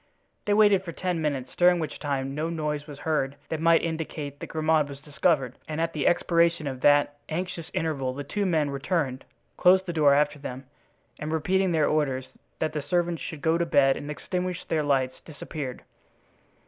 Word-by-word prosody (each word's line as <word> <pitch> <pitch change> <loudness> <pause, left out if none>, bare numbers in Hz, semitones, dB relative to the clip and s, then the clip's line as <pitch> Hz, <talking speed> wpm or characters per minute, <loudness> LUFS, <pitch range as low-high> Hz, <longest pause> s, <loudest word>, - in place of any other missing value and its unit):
They 205 - +2
waited 205 -3 +5
for 170 -3 -6
ten 180 -2 -2
minutes, 140 -4 -2
during 175 0 +5
which 155 -3 -4
time 135 -2 -2
no 155 +3 -2
noise 150 -2 -3
was 145 -2 -9
heard 145 -2 -1
that 160 -1 -3
might 165 0 +4
indicate 155 -3 -4
that - - -6
Grimaud 155 -2 +1
was 140 -1 -8
discovered, 145 -3 +1
and 155 0 -4
at 165 0 0
the 150 - 0
expiration 170 -2 +2
of 130 -2 -4
that 145 0 +4
anxious 170 0 -4
interval 155 -8 -1
the 145 - -4
two 200 +8 -1
men 155 -5 +1
returned, 140 -2 -2 0.3
closed 185 +1 +5
the 175 - -4
door 145 -3 +5
after 145 0 +1
them, 130 -1 -7 0.5
and 155 +1 -4
repeating 185 +4 +1
their 155 -3 +3
orders 135 -4 0 0.3
that 155 -1 -1
the 150 - -2
servants 170 +3 0
should 155 -3 -7
go 165 +1 +2
to 170 - +1
bed 135 -4 +4
and 145 - -7
extinguish 180 +4 -3
their 160 - 0
lights, 135 -3 0
disappeared. 145 -3 -7
155 Hz, 185 wpm, -26 LUFS, 145-170 Hz, 0.5 s, waited